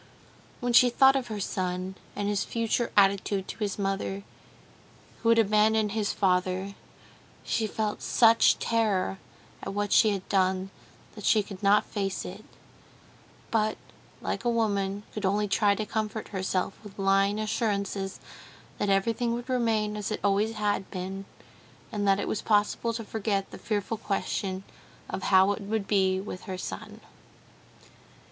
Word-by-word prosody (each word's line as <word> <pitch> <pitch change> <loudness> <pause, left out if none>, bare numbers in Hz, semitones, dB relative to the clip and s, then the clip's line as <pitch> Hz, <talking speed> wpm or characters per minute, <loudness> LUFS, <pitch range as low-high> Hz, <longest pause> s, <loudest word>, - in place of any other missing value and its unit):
When 245 -1 0
she 245 +1 +7
thought 265 +2 +5
of 260 -2 -1
her 215 -2 -4
son, 185 -1 -2 0.2
and 205 - -2
his 205 -1 0
future 230 +1 -1
attitude 195 -1 +3
to - - -7
his 205 -3 -2
mother, 195 0 -2 1.0
who 230 - +2
had 230 - +5
abandoned 215 0 +3
his 210 -1 0
father, 185 0 0 0.7
she 220 - 0
felt 215 0 -2
such 230 -1 +5
terror 210 -5 0 0.4
at 195 - -5
what 205 0 -1
she 220 - +6
had 195 -2 -3
done, 190 0 +1 0.4
that 210 - -10
she 215 0 +4
could 195 -2 -10
not 205 +1 +4
face 195 -2 -3
it; 195 +4 -8 1.1
but, 215 -1 +1 0.4
like - - -3
a 240 - +1
woman, 205 -3 0
could 210 - -5
only 205 +2 +1
try 200 0 +3
to 215 - -3
comfort 215 0 -3
herself 190 -1 -1
with 205 -2 -12
lying 195 +1 +2
assurances 200 -3 -2 0.6
that 205 - 0
everything 230 +4 +1
would 240 +1 -6
remain 225 -4 +1
as 210 -2 -3
it 215 - -2
always 205 +2 +2
had 205 -2 -1
been, 190 +1 -5 0.7
and 205 -1 -1
that 195 0 +4
it - - -2
was 215 - -2
possible 210 +2 +1
to 230 0 -4
forget 205 -2 -2
the - - -9
fearful 210 +1 -2
question 195 -2 -2 0.5
of - - -3
how 190 +1 +5
it 205 - -3
would 205 0 -2
be 190 -2 +2
with 190 -2 -7
her 185 -1 -5
son. 95 - -7
205 Hz, 155 wpm, -28 LUFS, 195-220 Hz, 1.1 s, she